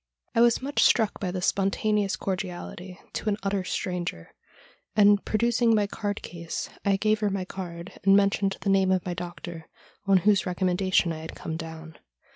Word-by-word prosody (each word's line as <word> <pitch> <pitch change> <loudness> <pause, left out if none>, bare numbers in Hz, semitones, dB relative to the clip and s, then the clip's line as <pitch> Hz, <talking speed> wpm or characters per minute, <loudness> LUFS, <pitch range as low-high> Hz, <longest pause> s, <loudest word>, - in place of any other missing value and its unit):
I 230 - +3
was 235 +1 +4
much 285 +1 0
struck 220 -4 +3
by 185 - -2
this 180 0 -2
spontaneous 200 0 +1
cordiality 185 -1 -5
to 215 - -2
an 205 - 0
utter 195 -1 0
stranger, 175 - -4 0.6
and, 205 -1 +5
producing 235 +1 +2
my 210 -1 +2
card 205 0 -4
case, 170 -1 -5
I 200 -1 +3
gave 215 +2 +1
her 210 -1 +1
my 190 -2 -2
card, 175 -2 -8
and 195 +1 +6
mentioned 200 -1 +1
the 195 - +1
name 190 -1 +3
of 185 -2 +1
my 180 - -2
doctor, 175 -1 -7 0.4
on 195 -1 +6
whose 205 -2 +5
recom 180 0 0
mendation 185 -2 +2
I 155 - -6
had 160 +1 -8
come 160 - -5
down. 160 -1 -8
195 Hz, 180 wpm, -26 LUFS, 180-205 Hz, 0.6 s, and